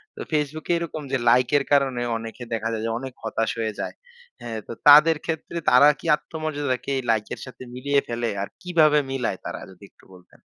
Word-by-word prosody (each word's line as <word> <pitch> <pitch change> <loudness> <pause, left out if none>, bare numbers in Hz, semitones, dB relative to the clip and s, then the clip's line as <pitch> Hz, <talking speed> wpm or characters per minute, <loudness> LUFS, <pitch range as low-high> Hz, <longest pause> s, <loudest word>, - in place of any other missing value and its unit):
তো - - -8
Facebook 150 0 -2
এ - - +4
এরকম 160 -2 -5
যে 135 - +2
লাইকের 125 +4 +3
কারণে 135 -3 +2 0.2
অনেকে 115 +2 -8
দেখা 110 0 -2
যায় 110 0 -3
যে 115 - -1
অনেক 130 -1 -7
হতাশ 110 0 -1
হয়ে 110 -1 -1
যায়। - - -4 0.5
হ্যাঁ, 110 -2 -5
তো - - -7 0.2
তাদের 150 +2 +8
ক্ষেত্রে 160 +1 -4
তারা 125 +4 +7
কি - - -14
আত্মমর্যাদাকে 145 -5 -3 0.2
লাইকের 110 -2 0
সাথে 130 0 -11
মিলিয়ে 140 +2 +1
ফেলে 120 0 -2
আর 100 - -3
কিভাবে 155 -4 +4
মিলায় 130 -3 -2
তারা? - - -5
যদি 95 +2 -18
একটু - - -25
বলতেন। 90 - -20
135 Hz, 190 wpm, -24 LUFS, 115-150 Hz, 0.5 s, তাদের